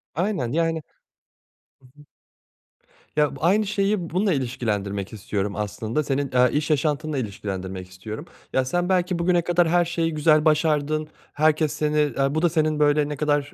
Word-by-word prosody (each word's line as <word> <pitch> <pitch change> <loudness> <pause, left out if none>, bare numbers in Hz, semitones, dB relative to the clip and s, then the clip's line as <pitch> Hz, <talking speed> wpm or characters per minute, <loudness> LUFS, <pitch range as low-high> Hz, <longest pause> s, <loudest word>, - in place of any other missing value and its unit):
Aynen, 175 - -1
yani 165 +1 0 1.1
Hı - - -21
hı. - - -18 1.1
Ya 150 -1 +2
b - - -11
aynı 200 +6 +3
şeyi 200 -3 0
bununla 190 +2 +1
ilişkilendirmek 105 -7 -2
istiyorum 100 -1 -3
aslında, 110 +6 -2
senin, 140 -1 -1
eee, 125 0 +5
iş 150 +2 -1
yaşantınla 150 0 0
ilişkilendirmek 95 -5 -5
istiyorum. 105 - -8 0.3
Ya 130 - +2
sen 175 +7 -1
belki 180 -1 +1
bugüne 175 0 +3
kadar 175 0 +2
her 175 +1 +3
şeyi 165 -1 -1
güzel 155 0 +3
başardın, 155 -1 +2 0.3
herkes 155 0 +2
seni, 150 0 -1
eee, 140 -1 +1
bu 155 - +1
da 175 - +3
senin 155 -2 +1
böyle 145 0 +3
ne 150 - -3
kadar, 145 -1 0
150 Hz, 160 wpm, -24 LUFS, 130-165 Hz, 1.1 s, eee